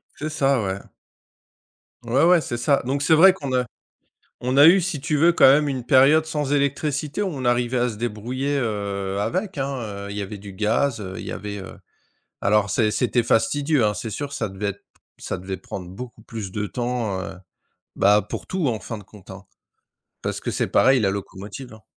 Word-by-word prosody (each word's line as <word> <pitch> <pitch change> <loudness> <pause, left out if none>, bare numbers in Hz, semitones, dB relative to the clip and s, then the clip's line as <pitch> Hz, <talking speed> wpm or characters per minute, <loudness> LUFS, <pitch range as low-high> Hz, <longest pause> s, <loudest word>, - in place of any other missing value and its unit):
C'est 155 +1 -4
ça, 135 -4 +1
ouais. 95 0 -2 1.3
Ouais, 125 +6 +2
ouais, 175 0 +5
c'est 120 -5 -4
ça. 140 +3 +2
Donc 140 +2 -1
c'est 160 +2 +4
vrai 185 +4 +8
qu'on 140 -8 -5
a 125 - +1 0.7
on 125 +1 -1
a 145 - +9
eu 180 +4 +7
si 170 -5 -2
tu 150 0 0
veux 170 +3 +5
quand - - +6
même 150 +1 +3
une 130 -3 -3
période 140 +5 +5
sans 150 -3 -2
électricité 145 +4 -1
où 205 - 0
on 140 -8 -5
arrivait 120 +1 +1
à 125 0 +1
se 110 - -6
débrouiller, 120 +6 -2
heu, 100 -4 -2
avec, 185 - -2
hein. 135 0 -1 0.4
Heu, - - -8
il 100 - -6
y - - -2
avait 100 +1 -6
du 100 -1 -10
gaz, 110 +5 0
heu, 95 -1 -7
il - - -7
y - - -5
avait, 105 0 -5
heu 95 - -10 0.7
alors 100 0 +3
c'est 105 +3 +2
c'était 120 +1 +1
fastidieux 135 +4 +2
hein, 105 - +1
c'est 110 +1 -5
sûr 145 +6 -4
que 140 - -8
ça 110 -6 -2
devait 95 +2 -5
être 100 - -12 0.3
ça - - -4
devait 95 +1 -5
prendre 90 -1 -8
beaucoup 115 +4 -9
plus 110 -4 -7
de 105 +1 -2
temps, 120 -4 -2
heu, - - -7 0.6
bah, 105 +1 +4
pour - - -6
tout 185 -5 -1
en 110 -4 -1
fin 115 - -6
de 105 - -11
compte, 100 -1 -17
hein. 95 +1 -10 0.8
Parce - - -2
que - - -4
c'est - - 0
pareil 130 -1 +4
la 100 -3 +2
locomotive, 100 +5 -7
hein 110 - -14
120 Hz, 215 wpm, -23 LUFS, 105-145 Hz, 1.3 s, a